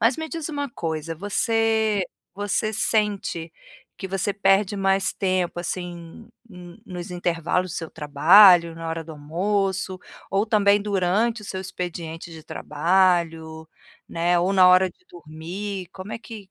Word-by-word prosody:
Mas 230 +3 +3
me 320 0 -5
diz 330 -1 -5
uma 285 -3 -4
coisa, 165 -4 -4
você 220 +1 +1 0.3
você 205 +3 -1
sente 205 -6 -1 0.4
que 190 - -6
você 195 +1 -1
perde 195 0 +2
mais 195 0 +1
tempo, 185 -3 -1
assim, 175 +3 -7 0.6
nos 180 -2 -7
intervalos 175 +1 -1
do - - -6
seu 165 - -5
trabalho, 170 +4 +6
na 165 0 -6
hora 165 0 -4
do 160 - -9
almoço, 190 +5 -2 0.3
ou, 195 +2 +1
também, 205 -2 +3
durante 205 +3 0
o - - -10
seu 190 -1 -5
expediente 170 -3 -6
de 160 -1 -11
trabalho, 165 -1 0 0.4
né, 175 +1 +1
ou 180 +3 +1
na 185 -1 +6
hora 185 0 +5
de - - -31
dormir? 175 +4 -7
Como 190 +2 -8
é - - -4
que 220 -4 -11
185 Hz, 145 wpm, -23 LUFS, 170-205 Hz, 0.6 s, trabalho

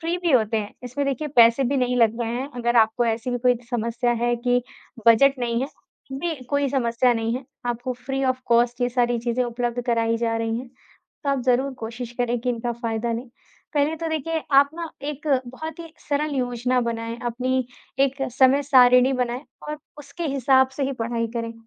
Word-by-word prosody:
Free 335 +1 -1
भी 350 -2 0
होते 225 -3 +3
हैं। 205 0 -4
इसमें 275 +3 -3
देखिए 275 +2 -2
पैसे 235 +3 +6
भी 275 +3 0
नहीं 250 -1 +1
लग 230 0 +3
रहे 230 -1 -1
हैं, 265 +3 -3
अगर 240 0 0
आपको 225 +1 +4
ऐसी 225 +2 -1
भी 245 - -1
कोई 250 +1 +3 0.2
समस्या 235 +1 0
है 240 0 +2
कि 245 +1 +1 0.5
बजट 275 +5 +6
नहीं 235 0 0
है, - - -1 0.5
बे 320 +5 -2
भी 255 - -12
कोई 285 -1 +1
समस्या 245 -2 +2
नहीं 225 +1 -1
है। 255 - -5 0.2
आपको 245 +1 -2
फ्री 270 0 -1
ऑफ 255 0 0
कॉस्ट 240 +1 +2
ये 245 - +2
सारी 240 -1 +1
चीज़ें 235 +2 -1
उपलब्ध 240 0 -2
कराई 230 -1 +1
जा 230 -1 0
रही 225 0 -1
हैं, 250 +1 -8
तो 270 +3 -9
आप 275 -1 0
ज़रूर 260 +2 +2
कोशिश 230 +1 -6
करें 245 0 +1
कि 250 +1 -1
इनका 240 0 -2
फ़ायदा 230 0 -2
लें। 240 +3 -5 0.5
पहले 295 +2 +1
तो 330 +1 -3
देखिए 315 +1 -2 0.2
आप 280 - +2
ना 335 -1 -5 0.2
एक 295 +1 -6 0.2
बहुत 315 +6 -7
ही 330 -1 -10 0.2
सरल 295 0 0
योजना 250 0 0
बनाएँ, 230 0 -3
अपनी 255 +1 -1 0.3
एक 275 0 +1 0.2
समय-सारिणी 260 -1 +5
बनाएँ 250 +1 -2 0.2
और 300 0 -4 0.2
उसके 315 +4 -7
हिसाब 265 0 +4
से 285 - -2
ही 275 - -1
पढ़ाई 230 0 -1
करें। 230 0 -3
245 Hz, 200 wpm, -23 LUFS, 235-270 Hz, 0.5 s, पैसे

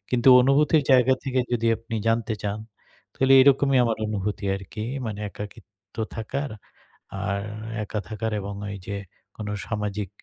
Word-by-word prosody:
কিন্তু 125 +1 +3
অনুভূতির 145 +3 +4
জায়গা 130 +1 +6
থেকে 130 -1 +1
যদি 115 -1 +1
আপনি 115 0 -6
জানতে 115 -1 +1
চান 105 +1 -2 0.6
তাহলে 135 0 +3
এরকমই 135 -1 +4
আমার 115 -2 0
অনুভূতি 105 -1 -3
আরকি। 95 +3 -7 0.2
মানে 105 -1 -4
একাকিত্ব 105 -1 -11 0.2
থাকার, 140 +6 -3 0.7
আর 100 0 -1 0.4
একা 105 +1 -3
থাকার 110 0 -3
এবং 100 +1 -5
ওই 100 - -5
যে 100 - -3 0.4
কোন 105 - -6 0.2
সামাজিক 105 -2 -3
110 Hz, 140 wpm, -25 LUFS, 105-130 Hz, 0.7 s, জায়গা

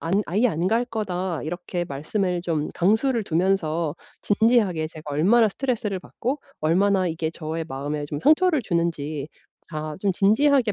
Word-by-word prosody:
안 190 +6 +1
"아예 210 +8 +2
안 170 -1 -1
갈 230 +4 +2
거다." 190 - -3
이렇게 175 +2 -3
말씀을 175 +6 -2
좀 160 -4 -1
강수를 220 +6 +2
두면서 165 -3 0 0.3
진지하게 205 -7 +2
제가 155 -2 -9
얼마나 215 +9 +4
스트레스를 220 -4 -2
받고 255 +9 -3 0.2
얼마나 185 +4 +3
이게 160 -1 -2
저의 160 0 -4
마음에 145 +2 -3
좀 145 0 -4
상처를 310 - +4
주는지 155 -6 -2 0.4
다 155 -2 -5
좀 195 -1 +1
진지하게 225 +4 +3
180 Hz, 330 characters per minute, -24 LUFS, 160-220 Hz, 0.4 s, 얼마나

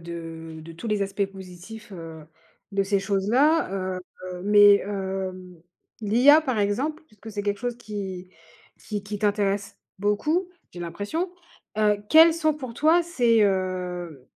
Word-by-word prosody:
de 165 -1 -8
de 165 +1 -10
tous 165 +8 -8
les 210 -2 0
aspects 195 +1 -1
positifs, 195 +3 -11
heu, 165 -3 -9 0.5
de 195 0 +2
ces 195 0 +1
choses-là, 220 +11 +2
heu 185 -1 -2 0.4
heu, 180 0 -7
mais 205 0 +7
hem, 190 -3 -5 0.4
l'IA 245 +8 +6
par 260 -7 -2
exemple, 265 +11 -1
puisque 220 -3 -12
c'est 205 -1 -4
quelque 200 0 -1
chose 245 +1 -3
qui 195 -5 -6 0.5
qui 210 -2 -5
qui 205 0 -6
t'intéresse 200 -1 0 0.2
beaucoup, 300 - 0 0.2
j'ai 175 - -10
l'impression, 205 - -3 0.5
heu, 210 -1 +3
quels 325 +4 +8
sont 315 -2 +1
pour 255 -6 -8
toi 320 +5 +4
ses, 240 -10 +3
heu, 180 -6 -2
205 Hz, 145 wpm, -25 LUFS, 185-230 Hz, 0.5 s, quels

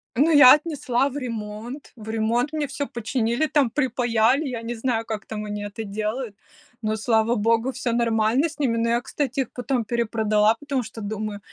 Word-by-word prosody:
Ну, 285 +7 +4
я 285 -4 +10
отнесла 285 -5 -1
в 280 - -6
ремонт. 230 +1 -6
В 220 -2 -10
ремонт 225 +5 0
мне 305 -2 -1
всё 275 +1 -3
починили 235 +4 -1
там, 285 -5 +2
припаяли. 245 0 +1
Я 250 -4 -4
не 235 +1 -4
знаю, 225 -1 -1
как 215 -2 -5
там 215 -1 -5
они 205 0 -4
это 205 +2 -6
делают, 215 +3 -3 0.5
но, 215 0 0
слава 225 +1 +2
богу, 230 +3 +1
всё 240 -1 -2
нормально 230 +3 +2
с 300 - -13
ними. 255 -6 +1
Но 230 0 +1
я, 235 +1 +2
кстати, 270 +1 -2
их 255 - -4
потом 250 -1 -1
перепродала, 220 -1 +2
потому 280 -3 -2
что, 220 0 -9
думаю, 210 0 -4
235 Hz, 185 wpm, -24 LUFS, 220-260 Hz, 0.5 s, я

